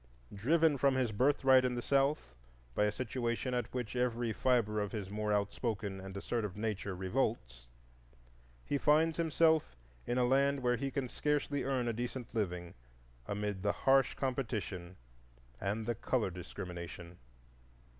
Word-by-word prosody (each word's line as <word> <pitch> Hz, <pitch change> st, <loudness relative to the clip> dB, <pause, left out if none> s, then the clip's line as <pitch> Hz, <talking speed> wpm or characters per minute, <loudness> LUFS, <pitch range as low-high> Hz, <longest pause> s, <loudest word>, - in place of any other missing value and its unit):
Driven 150 Hz, +7 st, +3 dB
from 135 Hz, +1 st, +3 dB
his 130 Hz, -4 st, +1 dB
birthright 130 Hz, +3 st, +4 dB
in 125 Hz, -1 st, 0 dB
the 120 Hz, -, -2 dB
South 135 Hz, -, +1 dB, 0.4 s
by 105 Hz, -, +2 dB
a 105 Hz, -, +2 dB
situation 120 Hz, +1 st, -2 dB
at 120 Hz, -2 st, -1 dB
which 125 Hz, -2 st, -4 dB
every 120 Hz, -2 st, 0 dB
fibre 115 Hz, -5 st, +2 dB
of 105 Hz, -1 st, -3 dB
his 100 Hz, -3 st, -4 dB
more 105 Hz, 0 st, -1 dB
outspoken 100 Hz, -1 st, -1 dB
and 95 Hz, 0 st, -7 dB
assertive 105 Hz, -1 st, -3 dB
nature 105 Hz, -3 st, -2 dB
revolts, 95 Hz, -, -2 dB, 1.0 s
he 140 Hz, -, 0 dB
finds 155 Hz, +2 st, +3 dB
himself 160 Hz, -, +3 dB, 0.3 s
in 120 Hz, -, 0 dB
a 125 Hz, -, +4 dB
land 140 Hz, +2 st, +3 dB
where 125 Hz, 0 st, +3 dB
he 140 Hz, +2 st, -2 dB
can 135 Hz, -1 st, -2 dB
scarcely 145 Hz, +1 st, -1 dB
earn 130 Hz, -3 st, 0 dB
a 115 Hz, -, 0 dB
decent 120 Hz, +1 st, -5 dB
living 90 Hz, -6 st, -2 dB, 0.5 s
amid 100 Hz, -1 st, -2 dB
the 100 Hz, +1 st, +2 dB
harsh 135 Hz, 0 st, +5 dB
competition 110 Hz, -9 st, -3 dB, 0.6 s
and 105 Hz, +3 st, -2 dB
the 120 Hz, -, 0 dB
color 115 Hz, -2 st, 0 dB
discrimination. 90 Hz, -1 st, -8 dB
120 Hz, 145 wpm, -34 LUFS, 100-135 Hz, 1.0 s, harsh